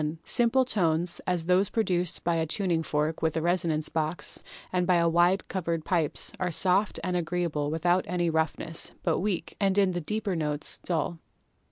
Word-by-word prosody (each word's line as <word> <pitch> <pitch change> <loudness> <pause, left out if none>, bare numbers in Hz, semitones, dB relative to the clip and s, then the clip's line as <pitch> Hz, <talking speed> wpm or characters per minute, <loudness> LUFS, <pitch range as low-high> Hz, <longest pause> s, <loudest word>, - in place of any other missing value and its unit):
Simple 245 +2 +4
tones, 170 -6 0
as 180 -3 0
those 185 +3 +3
produced 180 -6 -1
by 170 - +1
a 160 -1 0
tuning 175 -1 0
fork 155 0 -2
with 160 0 0
a - - 0
resonance 170 -3 0
box, 160 +1 -3 0.3
and 180 -1 +1
by 175 -2 +3
wide 175 +3 +2
covered 170 -4 -3
pipes, 165 -5 +1
are 180 - 0
soft 190 +5 +2
and 180 +1 -1
agreeable 170 -4 -1
without 175 +4 +1
any 175 0 -1
roughness, 160 0 -1
but 165 -3 +1
weak, 195 -2 -3
and 195 -1 +1
in 195 -2 +4
the 175 -1 -3
deeper 210 +2 -2
notes 150 -2 0
dull. 165 -1 -2
175 Hz, 170 wpm, -27 LUFS, 160-185 Hz, 0.3 s, Simple